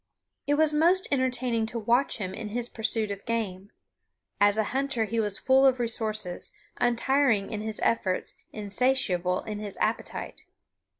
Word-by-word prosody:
It 290 - +3
was 310 0 +3
most 345 +5 +3
entertaining 250 -4 0
to 230 - -4
watch 235 +4 +1
him 190 -4 -4
in 215 +2 -6
his 240 +2 -2
pursuit 220 -1 -1
of 200 0 -6
game. 205 -4 -2 0.7
As 205 +1 +5
a 220 - +3
hunter 270 -4 0
he 230 +2 -2
was 205 -2 -1
full 265 +1 +4
of 260 -2 +4
resources, 215 -5 -2 0.3
untiring 240 -3 +2
in 215 -2 -3
his 220 0 -4
efforts, 190 -5 0 0.2
insatiable 200 -4 0
in 210 -1 -5
his 205 -2 -6
appetite. - - -3
225 Hz, 155 wpm, -27 LUFS, 205-255 Hz, 0.7 s, As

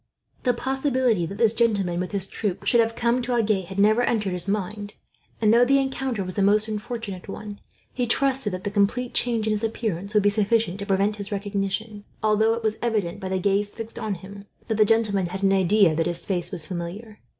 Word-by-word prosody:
The 245 -2 +1
possibility 260 - 0
that 195 - -7
this 225 0 +3
gentleman, 200 -7 +1
with 180 - -3
his 200 -3 0
troop, 195 -2 -3
should 235 - +4
have 230 0 +2
come 240 +1 +1
to 245 0 -2
Agen 215 -4 +2
had 190 +1 -8
never 215 +4 +4
entered 215 -5 0
his 180 +1 -1
mind; 205 +1 -3 0.4
and 215 -1 +4
though 235 +1 +6
the 275 +3 +4
encounter 265 -5 -1
was 185 0 -6
a - - +3
most 210 +2 +3
unfortunate 215 -3 -5
one, 205 +1 -7 0.3
he 245 -1 -1
trusted 265 -2 +2
that 185 0 -5
the 205 - -3
complete 215 +5 0
change 230 -3 +2
in 220 - +1
his 210 +1 -1
appearance 215 -3 -2
would 210 - +4
be 205 - +4
sufficient 210 -2 +1
to 200 - -5
prevent 200 +2 +1
recognition; 205 +1 -3 0.2
although 220 +1 +3
it 230 - -6
was 220 0 -1
evident, 205 -6 -1
by 190 -2 -5
the 190 - 0
gaze 200 +2 0
fixed 225 0 -7
on 215 -3 -2
him, 200 +3 -11 0.2
that 220 -3 -2
the 215 - +5
gentleman 205 -4 +2
had 190 +3 -6
an 195 0 +4
idea 190 -2 +4
that 165 +1 0
his 170 -1 0
face 180 -3 -1
was 155 - -3
familiar. 185 +6 -7
210 Hz, 215 wpm, -24 LUFS, 195-230 Hz, 0.4 s, though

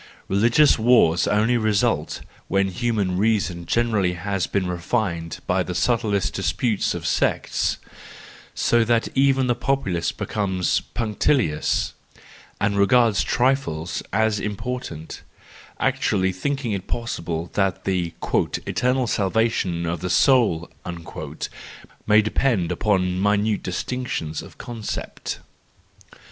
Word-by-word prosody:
Religious 120 +8 +4
wars 110 -8 +4
only 110 +4 +2
result, 110 -3 0 0.3
when 95 0 +1
human 100 -3 -1
reason 100 -5 0
generally 110 -6 +1
has 95 0 -2
been 100 -2 0
refined 85 -2 -2
by 90 +1 +1
the 90 0 -4
subtle 115 +4 +1
disputes 100 +2 0
of - - -6
sects; - - 0 0.8
so 120 -1 +3
that 115 0 +1
even 135 -1 +3
the 120 -1 +1
popu¬ 135 -5 -1
lace 85 - 0
becomes 95 -4 -1
punctilious 110 - +1 0.7
and 100 0 +1
regards 110 +1 +4
trifles 120 - 0
as 110 +1 +2
important, 105 -6 -5 0.6
actually 95 -2 +1
thinking 135 +6 -2
it 100 -2 -3
possible 85 -8 -3
that 95 -2 0
the 90 -3 -1
" - - -15 0.4
eternal 125 +1 +1
salvation 100 -5 0
of 85 0 -2
the 90 - -3
soul 100 - +3 0.7
" - - -10
may 105 0 +6
depend 110 -5 +1
upon 90 -1 +1
minute 105 +1 +2
distinctions 90 -5 -3
of - - -13
concepts. 115 -3 -5
105 Hz, 115 wpm, -23 LUFS, 90-120 Hz, 0.8 s, may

